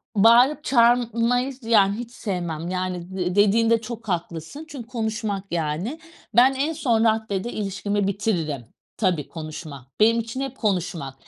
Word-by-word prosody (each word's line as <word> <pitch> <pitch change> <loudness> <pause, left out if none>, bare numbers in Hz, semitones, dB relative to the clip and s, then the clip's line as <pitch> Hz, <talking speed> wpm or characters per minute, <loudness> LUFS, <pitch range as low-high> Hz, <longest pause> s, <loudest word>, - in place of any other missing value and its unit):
Bağırıp, 240 +8 +5
çağırmayı 245 0 +2
yani, 210 -3 +3
hiç 240 -1 -7
sevmem 175 -8 -4
yani, 185 0 -4
d 180 0 -1
dediğinde 225 +3 +4
çok 230 -1 -8
haklısın. 175 - -4
Çünkü 260 -7 -8
konuşmak 220 -4 -3
yani. 170 - -2 0.4
Ben 255 +3 +6
en 285 +4 -1
son 240 -8 +1
raddede 220 -1 0
ilişkimi 200 0 -2
bitiririm. 175 - -1 0.3
Tabii, 180 -8 0
konuşma; 155 -4 -8
benim 230 +2 +5
için 230 +4 -5
hep 270 -1 -5
konuşmak. 175 - -2
215 Hz, 135 wpm, -23 LUFS, 180-235 Hz, 0.4 s, Ben